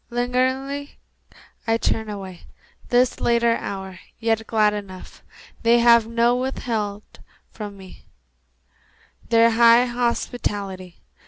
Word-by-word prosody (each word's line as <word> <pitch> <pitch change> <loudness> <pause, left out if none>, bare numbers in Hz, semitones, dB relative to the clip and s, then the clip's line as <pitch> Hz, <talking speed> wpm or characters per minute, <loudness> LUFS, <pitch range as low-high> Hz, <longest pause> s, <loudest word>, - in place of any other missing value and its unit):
Lingeringly 260 +4 -2 0.7
I 225 0 +2
turn 220 -1 -1
away, 190 -4 -8 0.4
This 245 0 +2
late 235 0 +1
hour, 195 -5 -2 0.2
yet 225 -1 -1
glad 215 -2 +2
enough 195 -3 -9 0.4
They 230 +1 +4
have 235 -1 +5
not 235 +2 +2
withheld 220 -5 -4 0.3
from 205 -2 -8
me 190 -1 -14 1.2
Their 230 0 +5
high 235 +1 +6
hospitality. 205 -6 -3
230 Hz, 100 wpm, -22 LUFS, 205-240 Hz, 1.2 s, high